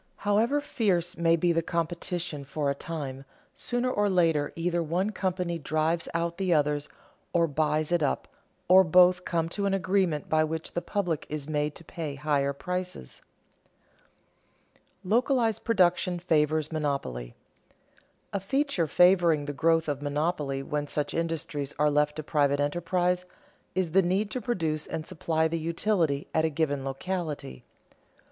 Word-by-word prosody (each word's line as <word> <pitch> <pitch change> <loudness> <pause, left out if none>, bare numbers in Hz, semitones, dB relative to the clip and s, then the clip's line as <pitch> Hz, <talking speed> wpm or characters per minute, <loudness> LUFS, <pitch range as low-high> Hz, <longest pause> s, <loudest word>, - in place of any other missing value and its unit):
However 220 +8 +2
fierce 180 - 0
may 165 0 +3
be 170 +1 +2
the 165 0 +2
competition 170 -2 -3
for 140 +1 -1
a - - 0
time, 140 -3 -6 0.3
sooner 245 +1 -1
or 205 -3 +1
later 165 -5 +2
either 170 +1 0
one 175 +6 0
company 180 -4 -2
drives 155 +3 0
out 170 +1 -1
the 190 -2 0
other 150 0 +2 0.5
or 170 -1 +4
buys 155 +1 0
it 175 -1 +2
up, 145 - 0 0.4
or 185 +1 +8
both 180 +1 +5
come 165 -1 0
to 200 +3 -2
an 195 - +1
agreement 185 -5 0
by 155 0 +3
which 160 +1 -3
the 175 - -2
public 180 -7 -2
is 150 -1 -4
made 150 -1 -1
to - - -12
pay 160 -3 -5
higher 140 -1 +1
prices. 180 - -5 1.5
[Sidenote: - - -33 0.2
Localized 230 +2 +1
production 180 -4 +2
favors 155 -2 +1
monopoly] 140 - -3 1.0
A 200 - 0
feature 270 - 0
favoring 175 -3 +4
the 145 - -4
growth 165 +2 +2
of 145 -2 -2
monopoly 145 -2 -1
when 145 +1 -2
such 150 0 -2
industries 160 -4 -3
are 150 0 +3
left 150 0 +2
to 155 - -5
private 145 -1 +1
enterprise, 175 +4 0 0.5
is 185 -3 0
the 195 +3 +5
need 190 +4 0
to 255 - -3
produce 165 -9 -2
and 155 - -4
supply 160 0 0
the 165 +1 -2
utility 165 -3 0
at 160 - +2
a 160 - +2
given 145 -3 -1
locality. 145 - -4
165 Hz, 155 wpm, -28 LUFS, 150-180 Hz, 1.5 s, or